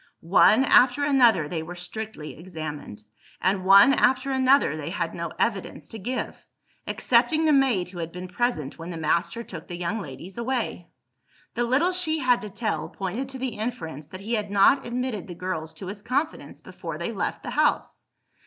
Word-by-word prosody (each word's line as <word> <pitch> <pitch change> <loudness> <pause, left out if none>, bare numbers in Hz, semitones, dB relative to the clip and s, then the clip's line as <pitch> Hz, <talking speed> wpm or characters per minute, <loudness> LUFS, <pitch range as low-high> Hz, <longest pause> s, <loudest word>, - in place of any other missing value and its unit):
One 210 +8 +5
after 255 +1 +5
another 245 - +4
they 160 +1 -3
were 170 +3 -8
strictly 180 -2 -7
examined; 155 - -7 0.4
and 190 +1 +1
one 200 +8 +7
after 260 +1 +2
another 265 - +3
they 155 0 -5
had 170 -2 -3
no 170 -1 -4
evidence 215 -5 -2
to 225 - -8
give 250 +6 -4 0.4
excepting 320 -1 +2
the 305 - +4
maid 255 -11 +2
who 180 -1 -9
had 165 0 -4
been 180 +1 -7
present 180 - -2
when 165 +1 -7
the 170 - -5
master 170 +7 0
took 175 -6 -9
the 175 - -6
young 180 +5 -2
ladies 175 - -9
away. 235 -8 -2 0.7
The 240 +1 0
little 280 +9 +2
she 360 -4 0
had 255 -4 +2
to 210 - -6
tell, 215 +2 -3
pointed 210 +8 -4
to 265 - -6
the 260 0 -2
inference 160 - -5
that 185 +3 -10
he 220 +4 -4
had 210 -3 -1
not 205 +7 +4
admitted 245 -4 -3
the 175 - -8
girls 165 -3 -4
to 175 - -8
his 200 +2 -7
confidence 280 +8 -3
before - - -7
they - - -3
left - - -3
the - - -5
house. - - 0
205 Hz, 185 wpm, -25 LUFS, 170-255 Hz, 0.7 s, one